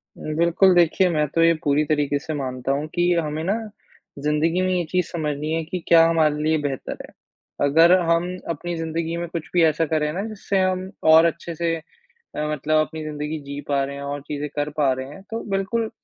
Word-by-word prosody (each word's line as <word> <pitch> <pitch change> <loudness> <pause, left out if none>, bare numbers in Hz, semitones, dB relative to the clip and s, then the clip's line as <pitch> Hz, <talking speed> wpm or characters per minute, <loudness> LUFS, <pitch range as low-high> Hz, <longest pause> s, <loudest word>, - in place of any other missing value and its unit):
उम, 155 0 -5
बिल्कुल, 170 +3 +4
देखिए 175 +2 +4
मैं 150 -2 +1
तो 165 - +4
ये 165 0 +5
पूरी 145 +1 +2
तरीके 145 -1 0
से 155 +1 -5
मानता 130 -2 -3
हूँ 145 +3 -1
कि 175 0 +3
हमें 155 -1 -1
ना 195 +4 +1 0.7
ज़िंदगी 160 +4 +1
में 185 - +1
ये 175 -1 +1
चीज़ 180 -2 +1
समझनी 150 -2 -3
है 165 0 -1
कि 180 +2 -4
क्या 165 -1 +7
हमारे 155 -2 +2
लिए 160 0 +2
बेहतर 140 -2 -4
है। - - -20 0.5
अगर 165 +4 +5 0.2
हम 175 +2 +1
अपनी 170 +2 -3
ज़िंदगी 165 +1 -3
में 170 0 -3
कुछ 165 -2 -5
भी 175 -2 +4
ऐसा 160 +1 +3
करें 150 -1 0
ना, 190 - -2
जिससे 200 -2 -2
हम 185 0 0 0.2
और 160 +1 +8
अच्छे 170 +1 -2
से 165 0 0
अ, - - -10 0.7
मतलब 150 +1 0
अपनी 160 -1 -7
ज़िंदगी 150 +1 -4
जी 140 +1 -6
पा 140 -1 +1
रहे 140 +1 -5
हैं, 140 - -7
और 140 0 -4
चीज़ें 145 0 -4
कर 145 0 -1
पा 140 -3 +3
रहे 130 +1 -5
हैं, 170 +7 -11
तो 225 - -3
बिल्कुल, 215 +4 -1
160 Hz, 215 wpm, -23 LUFS, 150-175 Hz, 0.7 s, और